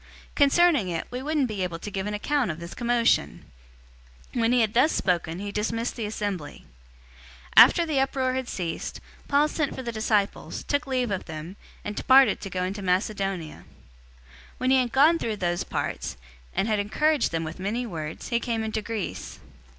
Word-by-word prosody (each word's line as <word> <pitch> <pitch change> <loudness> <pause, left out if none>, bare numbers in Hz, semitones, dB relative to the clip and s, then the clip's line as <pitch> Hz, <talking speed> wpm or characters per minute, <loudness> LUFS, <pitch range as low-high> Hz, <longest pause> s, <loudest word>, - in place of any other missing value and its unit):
Concerning 290 - +4
it, 165 -2 -3
we 250 +1 -4
wouldn't 295 -1 0
be 210 -4 -4
able 180 -2 -2
to 205 +5 -7
give 195 +1 -3
an 210 - -3
account 275 +3 0
of 155 0 -4
this 170 0 -8
commotion." 235 - +1 0.9
019:041 240 - 0
When 230 +1 +3
he 250 -1 +4
had 220 -1 +1
thus 260 +7 +4
spoken, 170 -3 0
he 200 +2 -5
dismissed 230 +3 -2
the 225 -3 -3
assembly. 205 -7 -4 0.9
020:001 - - +13
After 340 - 0
the 305 -4 0
uproar 265 -1 0
had 260 -1 -3
ceased, 170 -3 -4 0.3
Paul 290 +1 +3
sent 305 -2 -2
for 260 - -6
the 235 - -3
disciples, 215 -2 -1
took 285 +1 -1
leave 255 -4 0
of 190 - -2
them, 160 +3 -7 0.3
and 205 - -4
departed 265 +1 +5
to 195 - -5
go 180 0 -2
into 195 +3 -3
Macedonia. 190 -3 -1
020:002 - - -16 0.9
When 255 0 +1
he 265 - +6
had 250 -2 +1
gone 310 +6 +5
through 220 -2 -2
those 175 -3 -1
parts, - - -4 0.4
and 200 - +1
had 215 -2 +1
encouraged 295 +8 +1
them 165 0 -1
with 160 +3 -7
many 220 +6 -2
words, 160 -7 -6
he 235 - +1
came 230 -2 -2
into 220 0 -2
Greece. 215 -3 -5
220 Hz, 190 wpm, -26 LUFS, 185-260 Hz, 0.9 s, 020:001